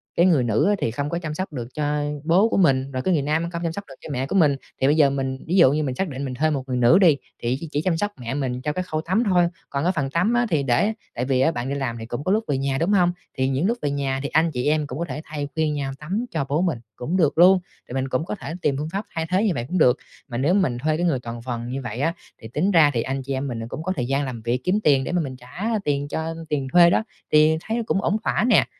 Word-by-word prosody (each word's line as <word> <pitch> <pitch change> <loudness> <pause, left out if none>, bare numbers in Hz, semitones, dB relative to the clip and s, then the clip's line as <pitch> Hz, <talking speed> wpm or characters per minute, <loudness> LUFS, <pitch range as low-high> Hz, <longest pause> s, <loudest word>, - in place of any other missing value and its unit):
cái 170 - +4
người 160 -9 +4
nữ 115 - +2
á 205 - +3
thì 115 - 0
không 140 +5 -3
có 170 - -2
chăm 155 -3 -5
sóc 185 +1 -4
được 120 -4 -4
cho 150 0 -1 0.3
bố 185 +7 +4
của - - 0
mình, 135 -7 +3
rồi 130 -1 -2
cái 185 - +2
người 155 - +2
nam 160 +4 0
không 170 0 -4
chăm 165 - 0
sóc 200 - -5
được 135 - -12
cho - - -9
mẹ 130 0 -1
của 195 - -3
mình, 155 -7 +4 0.3
thì 135 - +4
bây 145 - +4
giờ 150 -3 +5
mình 135 -1 -2
ví 175 - 0
dụ 170 -8 +7
như 155 +1 0
mình 130 -3 -2
xác 190 - -1
định 140 0 -5
mình 130 - -4
thuê 155 +5 +1
một 140 -4 -1
người 125 -1 -1
nữ 125 +9 +5
đi, 165 -7 +5 0.3
thì 120 +2 0
chị 165 - -5
chỉ 145 - 0
chăm 165 0 0
sóc 205 +4 -1
mẹ 120 0 -4
mình 130 -3 -2
cho 150 +3 -2
cái 185 - -2
khâu 155 -3 -3
tắm 185 +8 +1
thôi, 180 -4 +4 0.2
còn 140 0 -2
cái 180 - +3
phần 140 -4 -1
tắm 180 - +1
á 240 0 +3
thì 155 -6 +1
để 135 - +2 0.2
tại 125 - -1
vì 130 -1 +1
á 160 - +4
bạn 125 -4 -4
đi 140 - -1
làm 130 -4 -2
thì 115 - -6
cũng 120 +4 -5
có 185 - 0
lúc 215 +2 +2
về 140 - 0
nhà, 135 0 -1
đúng 165 +7 +1
hông? 180 -3 +4 0.3
Thì 130 0 +1
những 135 +7 +1
lúc 235 +2 0
về 145 - -1
nhà 135 -1 -1
thì 140 - -2
anh 160 +2 +2
chị 125 -2 -2
em 150 0 +1
cũng 135 +1 -6
có 170 - -1
thể 150 - -4
thay 150 -1 -4
phiên 160 -1 +1
nhau 140 -2 -2
tắm 195 +10 -2
cho 160 -8 -1
bố 150 +4 +1
mình 170 -10 0 0.2
cũng 160 +9 -2
được 155 -5 +2
luôn, 185 +2 +7 0.3
thì - - -9
mình 135 0 -1
cũng 130 +5 -1
có 200 - -4
thể 165 -4 -7
tìm 140 -4 +1
phương 150 +2 -3
pháp 200 +2 -2
thay 160 0 -1
thế 185 +3 +2
như 215 - +2
vậy 120 - -3
cũng 185 - -2
được. 130 -5 +5 0.3
Mà 120 -4 -5
nếu 145 +8 +2
mình 170 -12 +2
thuê 155 +5 0
cái 175 - 0
người 155 -7 +1
toàn 120 -1 -7
phần 120 -1 -4
như 130 +2 -4
vậy 120 -2 -5
á, 160 +4 +1 0.3
thì 110 - -8
tính 155 - 0
ra 160 -5 +6
thì 115 - 0
anh 135 +3 -3
chị 135 +1 -3
em 135 +1 -2
mình 120 -3 -4
là 115 - -4
cũng 155 - -5
có 185 - -1
thời 125 - -1
gian 140 +2 0
làm 125 -4 -6
việc 120 +3 -1
kiếm 190 +3 +2
tiền 140 -3 +4
để - - -4
mà 175 -1 +1
mình 135 -4 -5
trả 125 - -5 0.2
tiền 145 -1 0
cho 160 +2 -3
tiền 140 -3 -1
thuê 175 -1 +8
đó, 190 - +2 0.3
thì 155 +1 +5
thấy 230 +4 -2
cũng 195 - +1
ổn 200 +2 +1
thỏa - - +1
nè. - - +5
150 Hz, 320 wpm, -23 LUFS, 130-170 Hz, 0.3 s, thuê